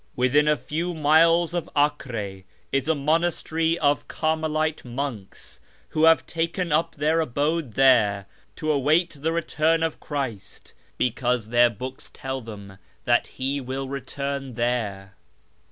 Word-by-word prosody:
Within 135 +4 +3
a 150 0 +3
few 170 +5 -3
miles 165 +3 +4
of 175 -3 -3
Acre 115 -10 -1 0.3
is 135 +1 0
a 160 - +2
monastery 165 +2 0
of 145 -3 +1
Carmelite 155 0 -1
monks, 120 -5 -6 0.3
who 155 +1 +2
have 165 0 +5
taken 170 +1 -2
up 155 +3 +1
their 155 +2 +1
abode 145 -2 -1
there 110 -7 +4 0.3
to 155 0 -1
await 155 +5 +2
the 160 +2 0
return 165 0 +1
of 165 -1 -2
Christ, 135 -9 -6 0.2
because 125 -2 0
their 120 +1 +5
books 125 +4 -7
tell 135 0 -5
them 100 -4 -10 0.3
that 120 0 +3
He 135 +2 -1
will 135 +1 -4
return 140 -1 -4
there. 110 -5 -2
140 Hz, 135 wpm, -24 LUFS, 125-160 Hz, 0.3 s, have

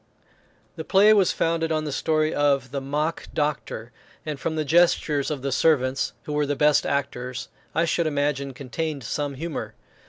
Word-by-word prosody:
The - - -4
play 205 +2 +6
was 200 -4 +4
founded 165 0 0
on 155 -1 0
the 150 - -3
story 155 +2 +1
of 140 -4 +1
the 140 0 -3
"Mock 150 +4 -2
Doctor;" 145 -6 -2 0.3
and, 150 -3 -4
from 160 - -2
the 155 -1 -1
gestures 155 -3 +3
of 145 -4 -4
the 140 - -1
servants, 135 -2 +2
who 150 - -5
were 150 -1 +1
the 145 - 0
best 150 +1 +3
actors, 125 -3 -3 0.3
I 165 - +3
should 170 0 +1
imagine 140 -2 -1
contained 140 +2 -4
some 145 +4 -3
humour. 165 +3 -5
150 Hz, 175 wpm, -24 LUFS, 140-160 Hz, 0.3 s, play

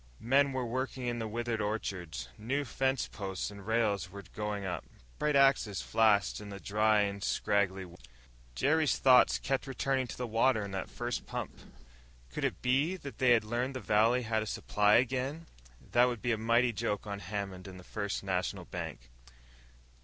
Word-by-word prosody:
Men 135 +4 +3
were 130 -2 -2
working 130 +1 -3
in 120 -1 -1
the 110 - -3
withered 115 0 -2
orchards. 90 - -3
New 135 +7 -2
fence 135 +1 0
posts 95 -1 -4
and 100 0 -11
rails 110 -4 +1
were 100 +1 -9
going 105 -2 -3
up; 90 -2 -3 0.4
bright 150 -1 +1
axes 135 -8 +3
flashed 105 -3 +3
in 105 - -9
the 100 -1 -7
dry 105 +1 +3
and 100 -1 -2
scraggly 100 -3 0
wood 85 -1 -14
lots. - - -18 0.5
Jerry's 155 - +2
thoughts 130 -2 +6
kept 135 0 -2
returning 135 -1 0
to - - -8
the 125 - -2
water 115 -1 +2
in 100 - -7
that 95 - -4
first 120 -1 -4
pump. - - -5 0.8
Could - - -4
it - - -3
be 135 +8 +2
that 140 -7 -9
they 130 - +4
had 115 - +3
learned 120 +5 -2
the - - -2
valley 115 +3 +3
had 110 -1 0
a 110 - -4
supply 105 0 +2
again? 130 +6 0 0.5
That 120 +1 +6
would 120 -3 -2
be 120 - +1
a 110 - +1
mighty 115 +2 +3
joke 105 -1 -2
on 100 -1 -5
Hammond 95 -1 -5
and 95 -1 -9
the - - -12
First 100 +1 -3
National 95 -2 -2
Bank. - - -6
110 Hz, 185 wpm, -31 LUFS, 100-125 Hz, 0.8 s, thoughts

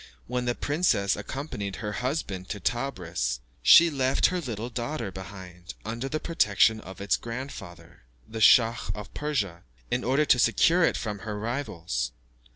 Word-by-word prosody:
When 125 0 -2
the 120 0 0
princess 145 - +1
accompanied 100 -4 -5
her 105 +5 -4
husband 105 - -3
to 105 - -4
Tebris, 90 - -2 0.2
she 170 0 +8
left 135 -2 +2
her 180 - -1
little 120 -4 -5
daughter 120 -1 -3
behind, 90 -1 -10
under 115 +4 -4
the 155 - -2
protection 110 - +3
of 95 0 -11
its 100 +1 +1
grandfather, 115 -7 -8 0.3
the 110 0 -6
Schach 115 +2 +5
of 105 -1 -9
Persia, 105 - -2 0.3
in 120 +1 0
order 135 +5 +2
to 125 - +4
secure 165 - +4
it - - +2
from 105 -2 -4
her 105 +1 -5
rivals. 85 - -3
115 Hz, 155 wpm, -27 LUFS, 95-135 Hz, 0.3 s, she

